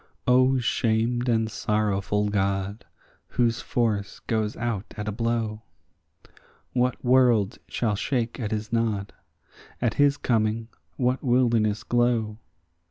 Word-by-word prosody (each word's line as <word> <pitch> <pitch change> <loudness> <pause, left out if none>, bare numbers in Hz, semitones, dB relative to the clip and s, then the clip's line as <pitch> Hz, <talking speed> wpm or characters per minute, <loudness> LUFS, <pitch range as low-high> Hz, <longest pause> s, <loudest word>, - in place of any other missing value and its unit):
O 130 +1 +4
shamed 120 +1 0
and 115 -1 +2
sorrowful 105 -1 0
God, 100 +1 -1 0.4
whose 120 -1 0
force 105 -5 -1
goes 110 -2 -1
out 110 -4 -3
at 105 0 -4
a - - 0
blow! 115 -1 -2 1.1
What 125 0 0
world 120 -5 +3
shall 110 -4 -1
shake 120 +3 -2
at 110 -4 -2
his 110 +1 -4
nod? 110 -4 0 0.7
at 120 -3 +1
his 145 0 +4
coming 110 -2 0 0.3
what 125 0 0
wilderness 120 -5 +2
glow? 120 -3 +1
115 Hz, 115 wpm, -25 LUFS, 105-120 Hz, 1.1 s, O